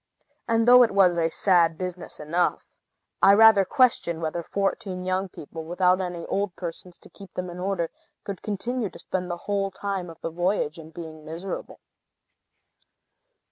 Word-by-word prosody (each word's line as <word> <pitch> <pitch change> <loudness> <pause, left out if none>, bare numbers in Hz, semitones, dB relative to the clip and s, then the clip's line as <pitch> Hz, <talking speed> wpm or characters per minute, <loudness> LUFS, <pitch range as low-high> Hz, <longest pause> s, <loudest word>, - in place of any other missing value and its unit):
And 230 0 +2
though 250 0 +9
it 240 - +5
was 190 -3 +4
a 165 -1 +1
sad 170 -2 +3
business 180 -1 -6
enough, 165 +4 0 0.6
I 200 +1 +7
rather 220 -2 +7
question 210 -8 +2
whether 165 +1 -2
fourteen 190 0 -2
young 185 +1 -1
people, 160 0 -9
without 180 +3 +2
any 175 -2 -4
old 200 -3 -2
persons 175 0 -7
to - - -16
keep 195 -1 -13
them 180 -1 -4
in 175 - -9
order, 180 -3 -1 0.3
could 195 -3 -6
continue 220 +2 -2
to - - -13
spend 180 -1 -4
the 175 - -3
whole 200 -1 0
time 195 -2 -4
of 165 - -12
the 165 - -4
voyage 175 -2 -1
in 160 -1 -11
being 160 -2 -9
miserable. 165 +5 -6
180 Hz, 165 wpm, -25 LUFS, 170-195 Hz, 0.6 s, though